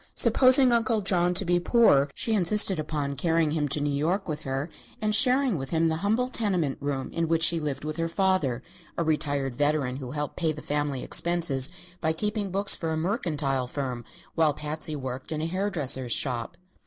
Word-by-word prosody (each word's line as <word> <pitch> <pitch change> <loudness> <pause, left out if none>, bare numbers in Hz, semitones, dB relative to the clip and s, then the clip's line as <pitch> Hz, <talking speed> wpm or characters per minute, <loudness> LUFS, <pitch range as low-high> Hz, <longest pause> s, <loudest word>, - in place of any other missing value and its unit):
Supposing 255 0 +6
Uncle 230 -2 +2
John 180 -2 +2
to 195 - +3
be 175 0 +2
poor, 175 - +4
she 225 - -2
insisted 195 -2 +2
upon 150 -2 -3
carrying 160 +2 +1
him 150 -2 -1
to 145 - -1
New 145 0 -1
York 170 +8 -1
with 155 -2 -4
her 135 +2 -3 0.3
and 215 0 -1
sharing 250 - +2
with 135 - -6
him 165 0 +1
the 160 - -1
humble 220 +7 0
tenement 190 - -1
room 135 -2 -3
in 165 0 -1
which 165 0 +1
she 165 0 +2
lived 145 -2 -4
with 155 +1 -4
her 165 0 -1
father 165 -10 0 0.3
a 170 - 0
retired 145 -4 -1
veteran 145 -3 0
who 130 -3 -7
helped 150 +2 -5
pay 160 -3 0
the 150 - -9
family 145 -3 -2
expenses 165 -7 +2 0.3
by 160 -1 +1
keeping 210 +3 -2
books 195 +2 +3
for 165 - -1
a 160 - -1
mercantile 155 - -1
firm, 125 -3 -4 0.3
while 155 -3 +2
Patsy 150 +1 -4
worked 130 0 -6
in 155 - -2
a 155 - -2
hair 185 +5 -1
dresser's 130 -8 -1
shop. 130 +5 -1
160 Hz, 195 wpm, -26 LUFS, 140-185 Hz, 0.3 s, Supposing